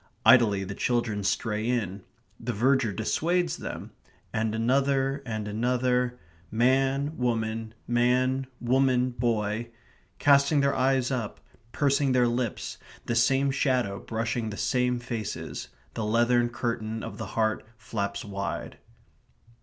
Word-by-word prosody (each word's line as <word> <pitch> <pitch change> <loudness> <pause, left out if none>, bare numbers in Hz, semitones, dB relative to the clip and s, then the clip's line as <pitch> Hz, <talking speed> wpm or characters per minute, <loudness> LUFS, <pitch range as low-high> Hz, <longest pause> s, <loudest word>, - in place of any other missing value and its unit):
Idly 110 -6 +6
the 95 +1 -5
children 115 -2 0
stray 110 +3 -1
in 105 -5 -1 0.4
the - - -3
verger 130 +1 +2
dissuades 170 - 0
them - - -6 0.4
and 110 0 0
another 135 +3 +1
and 110 -2 -3
another... 125 +3 0 0.3
man, 135 +5 +2
woman, 110 -2 -1
man, 125 +2 +2
woman, 125 0 +2
boy... 115 -1 -1 0.5
casting 140 +1 +4
their 140 0 +2
eyes 130 0 +2
up, 120 -5 -3 0.3
pursing 140 -2 +2
their 125 -1 +4
lips, 120 -1 -2 0.3
the 120 - -1
same 135 +4 +3
shadow 125 -7 0
brushing 115 0 -2
the 100 - -6
same 125 -1 +1
faces; 110 -9 -5 0.3
the 115 - -3
leathern 120 +2 +3
curtain 115 -2 -3
of - - -7
the 110 - -4
heart 110 -1 +1
flaps 100 -2 -4
wide. 100 -1 -4
120 Hz, 120 wpm, -27 LUFS, 110-130 Hz, 0.5 s, Idly